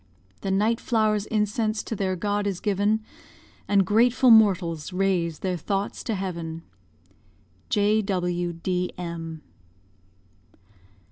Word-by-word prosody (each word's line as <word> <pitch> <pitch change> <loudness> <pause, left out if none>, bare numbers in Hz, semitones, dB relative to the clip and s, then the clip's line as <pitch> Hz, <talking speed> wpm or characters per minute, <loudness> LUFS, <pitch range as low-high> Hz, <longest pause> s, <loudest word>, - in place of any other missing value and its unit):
The 195 - -4
night 215 +4 +2
flower's 215 -3 +1
incense 215 0 0
to 225 - -4
their 190 -2 -1
God 205 +2 -1
is 190 -3 -2
given, 205 +2 +1 0.7
And 200 -2 +3
grateful 240 +4 +4
mortals 185 -8 +4
raise 180 -4 0
their 185 -2 -1
thoughts 195 +5 -3
to 225 - -1
heaven. 170 -4 -5 1.1
J.W.D.M. 180 -5 -1
195 Hz, 95 wpm, -25 LUFS, 175-210 Hz, 1.1 s, grateful